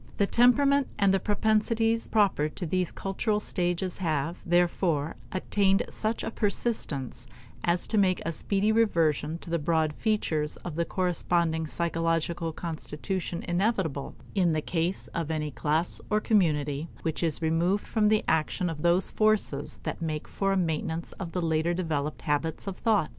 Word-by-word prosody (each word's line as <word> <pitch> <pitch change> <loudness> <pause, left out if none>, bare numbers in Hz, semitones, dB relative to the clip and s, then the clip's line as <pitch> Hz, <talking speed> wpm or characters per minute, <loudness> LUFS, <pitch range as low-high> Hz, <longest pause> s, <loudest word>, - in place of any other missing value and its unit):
The 200 - +3
temperament 270 +5 +4
and 200 -1 +4
the 195 - +3
propensities 220 +3 +1
proper 195 -8 +2
to 175 - -5
those 180 +1 0
cultural 210 +2 -1
stages 180 -2 -1
have, 165 -1 -1
therefore, 175 -3 +1 0.2
attained 195 +1 +2
such 220 +1 -2
a - - -3
persistence 180 - -2 0.4
as 175 0 +2
to 220 - +1
make 185 -2 +3
a 165 - 0
speedy 200 +5 0
reversion 165 -8 +2
to 170 - -8
the 170 - +1
broad 160 0 +1
features 160 -8 -1
of 175 - -4
the 170 +2 0
corresponding 170 -3 0
psychological 165 0 -1
constitution 170 +2 -4
inevitable 175 -6 -1 0.2
in 180 -5 +2
the 155 - +1
case 170 +3 -1
of 165 -3 -3
any 155 -2 -2
class 155 +5 -1
or 210 - +3
community 155 -8 +1 0.2
which 160 -2 -1
is 165 -3 0
removed 170 +5 +1
from 215 -2 +2
the 215 0 +3
action 160 +3 +1
of 150 -2 -7
those 175 +3 +3
forces 215 -10 +1
that - - -4
make 155 -2 -3
for 195 0 -1
a 195 - +2
maintenance 165 -1 -1
of 180 -4 -5
the 180 0 -2
later 160 +1 +1
developed 155 -4 -2
habits 150 +2 -1
of 195 -2 -4
thought. 210 -8 +1
175 Hz, 160 wpm, -28 LUFS, 160-200 Hz, 0.4 s, temperament